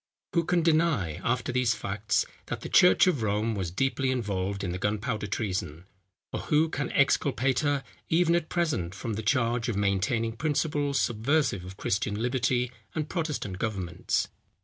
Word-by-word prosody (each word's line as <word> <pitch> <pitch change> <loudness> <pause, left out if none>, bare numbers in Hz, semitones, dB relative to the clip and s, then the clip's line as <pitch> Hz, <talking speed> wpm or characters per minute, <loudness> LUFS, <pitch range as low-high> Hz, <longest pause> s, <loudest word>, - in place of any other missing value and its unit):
Who 170 -2 +2
can 175 -1 +2
deny, 155 - +2
after 125 +1 0
these 125 -2 +2
facts, 100 +2 -1 0.2
that - - -4
the - - -6
church 180 - +6
of 175 -10 +1
Rome 110 +1 0
was 95 -5 -2
deeply 135 +7 0
involved 100 -5 -2
in 90 - -2
the 90 - -4
gunpowder 105 +1 -1
treason? 95 -5 -3 0.5
Or - - -1
who 155 +2 +2
can 145 -2 -3
exculpate 135 -1 +2
her, 145 -2 +1 0.3
even 170 +1 +3
at 170 -2 0
present, 145 - -1
from 110 +3 -4
the 105 - -3
charge 120 +1 +1
of 115 - -1
maintaining 105 +3 0
principles 145 -1 0
subversive 120 - +1
of 95 +1 -9
Christian 100 +1 -1
liberty 125 0 +1 0.2
and 155 -1 -2
Protestant 150 - -3
governments? 95 -6 -1
120 Hz, 160 wpm, -28 LUFS, 100-145 Hz, 0.5 s, church